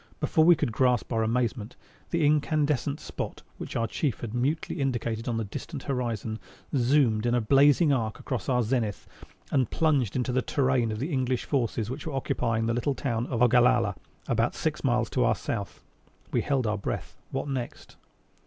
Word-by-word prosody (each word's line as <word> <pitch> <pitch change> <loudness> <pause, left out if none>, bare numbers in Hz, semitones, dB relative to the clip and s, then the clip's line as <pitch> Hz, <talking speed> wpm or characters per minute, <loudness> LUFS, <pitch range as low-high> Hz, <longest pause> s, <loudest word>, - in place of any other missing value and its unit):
Before 160 - +3
we 175 0 +8
could 120 -7 -2
gasp 125 -2 +2
our 115 - +1
amazement, 115 0 -1 0.3
the 170 -3 +1
incandescent 150 -1 +1
spot - - -6 0.2
which - - -6
our 115 - +1
Chief 130 +2 -2
had 115 -2 -5
mutely 140 +5 -1
indicated 120 -3 -2
on 120 -2 0
the 115 - -1
distant 135 - -7
horizon, 115 -5 -2 0.4
zoomed 120 -4 +3
in 120 - +2
a - - +3
blazing 140 +6 +5
arc 115 -4 -1
across 130 -1 -4
our 125 -2 +2
zenith 110 -3 -1 0.4
and 130 -4 +2
plunged 145 -9 +1
into 125 -1 0
the 130 +1 +1
terrain 130 -4 +1
of 110 - -3
the 145 +8 -3
English 130 -2 0
forces 120 -4 -1
which 140 +4 -6
were 155 - -4
occupying 115 -4 0
the 115 - +1
little 125 +4 0
town 120 -3 -2
of 120 -2 +1
Ogallala 120 -3 +4 0.3
about - - +1
six - - -2
miles - - +2
to - - +2
our - - +3
south. - - -5 0.5
We - - +1
held 135 -4 0
our 105 -1 0
breath. - - -4
What 135 +2 -3
next? 130 -4 -5
125 Hz, 180 wpm, -27 LUFS, 115-140 Hz, 0.5 s, we